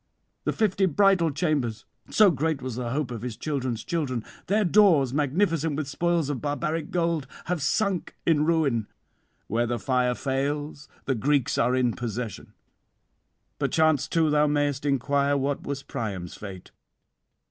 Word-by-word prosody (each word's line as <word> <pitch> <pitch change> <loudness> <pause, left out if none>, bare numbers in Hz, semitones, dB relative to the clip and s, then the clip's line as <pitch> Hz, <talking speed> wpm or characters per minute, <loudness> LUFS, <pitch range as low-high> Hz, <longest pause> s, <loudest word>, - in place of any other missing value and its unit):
The - - +2
fifty 200 -3 +1
bridal 185 0 +4
chambers 140 -8 -1 0.2
so 210 -3 +6
great 160 0 -1
was 130 -3 -5
the 125 -1 -3
hope 135 0 -2
of 115 -3 -5
his 120 -2 -5
children's 130 -6 -3
children 135 -9 -2 0.2
their 210 +2 +2
doors 170 - +4
magnificent 160 +1 +1
with 150 -1 -3
spoils 170 +2 0
of 145 -3 -3
barbaric 155 +2 -2
gold, 165 -5 0 0.2
have 175 -3 -2
sunk 190 +6 0
in 155 -3 +3
ruin; 150 -9 +1 0.6
where 120 +4 0
the 120 0 -1
fire 125 -1 +1
fails 145 +2 -2 0.2
the 135 - +1
Greeks 140 +3 +1
are 125 +2 +3
in 125 -2 +2
possession. 120 -1 -5 1.1
'Perchance 155 -4 +2
too 160 -2 +2
thou 150 0 +4
mayest 145 -1 0
inquire 140 +1 +1
what 140 +1 -1
was 140 -1 -3
Priam's 100 -9 -5
fate. 95 -3 -9
145 Hz, 145 wpm, -26 LUFS, 125-160 Hz, 1.1 s, so